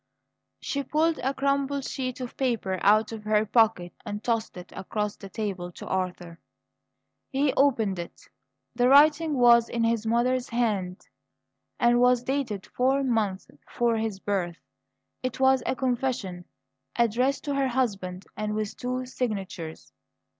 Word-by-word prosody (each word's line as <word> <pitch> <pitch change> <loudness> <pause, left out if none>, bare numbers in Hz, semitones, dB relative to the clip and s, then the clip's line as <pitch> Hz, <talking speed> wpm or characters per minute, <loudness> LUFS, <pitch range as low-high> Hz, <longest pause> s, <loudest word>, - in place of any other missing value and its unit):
She 280 - -2
pulled 315 +3 +1
a 265 +2 0
crumpled 275 0 0
sheet 255 -2 -4
of 250 - -6
paper 225 -8 -1
out 215 +2 +4
of 220 -2 -7
her 215 0 +2
pocket 215 -6 +2
and 205 +1 -5
tossed 230 -5 -1
it 180 0 -10
across 210 +2 -3
the 195 - -11
table 190 -4 -4
to - - -9
Arthur. 180 -2 -3 0.9
He 275 0 +1
opened 225 -9 +2
it; 170 - -9 0.5
the 245 +1 +3
writing 300 +2 +5
was 235 -1 +6
in 235 -1 -1
his 230 -1 +1
mother's 245 +2 +1
hand, 205 -6 -1 0.7
and 240 0 +4
was 250 0 +4
dated 250 -7 -2
four 265 +2 +1
months 215 -7 0
before 235 -1 -2
his 220 -3 -2
birth. 185 -4 -2 0.6
It 255 -1 -4
was 265 -1 +4
a - - 0
confession, 240 -8 -2 0.5
addressed 240 +4 +1
to 285 - -2
her 275 -1 +1
husband, 200 -8 -2
and 210 0 -3
with 215 -1 -3
two 255 +1 -3
signatures. 195 - -5
235 Hz, 145 wpm, -26 LUFS, 200-260 Hz, 0.9 s, was